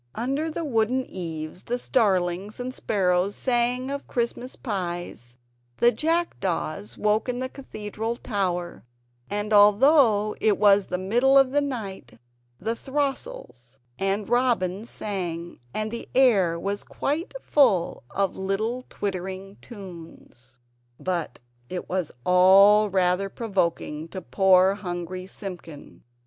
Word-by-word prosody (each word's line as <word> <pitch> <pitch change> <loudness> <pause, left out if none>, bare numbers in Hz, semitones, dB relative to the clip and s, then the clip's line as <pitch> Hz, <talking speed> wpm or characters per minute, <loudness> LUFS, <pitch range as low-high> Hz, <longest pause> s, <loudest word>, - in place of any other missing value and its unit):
Under 275 +7 -1
the 325 +1 -4
wooden 250 0 +1
eaves 165 -1 -6
the 245 - -2
starlings 195 -4 0
and 250 +1 -4
sparrows 190 -4 0
sang 250 +1 0
of 280 0 -5
Christmas 245 +1 -3
pies; 175 - -5 0.4
the 240 - +5
jackdaws 195 - -2
woke 215 +3 +1
up 250 - -1
in - - -5
the 255 +1 -2
Cathedral 225 -4 -5
tower; 185 -7 -3 0.5
and 205 +1 -2
although 215 +1 +5
it 215 -2 +3
was 200 -1 +5
the 180 - -2
middle 240 +9 +3
of 270 -1 +5
the 290 +1 +2
night 230 -9 -5 0.4
the 225 +4 -2
throstles 270 - -4 0.2
and 195 +1 -1
robins 230 -4 +1
sang; 175 -5 -4
and 215 - -3 0.2
air 200 -11 +4
was 200 +3 -3
quite 325 - -3
full 210 - +2
of 195 -2 -1
little 215 +6 -2
twittering 190 0 -5
tunes. 165 - -12 0.4
But 175 -8 -3 0.3
it 180 - -5
was 180 -4 -2
all 195 +4 +6
rather 185 +1 +1
provoking 170 -8 -2
to 185 +2 -7
poor 190 0 +4
hungry 185 -1 -5
Simpkin. 180 -7 -9
200 Hz, 120 wpm, -25 LUFS, 180-240 Hz, 0.5 s, all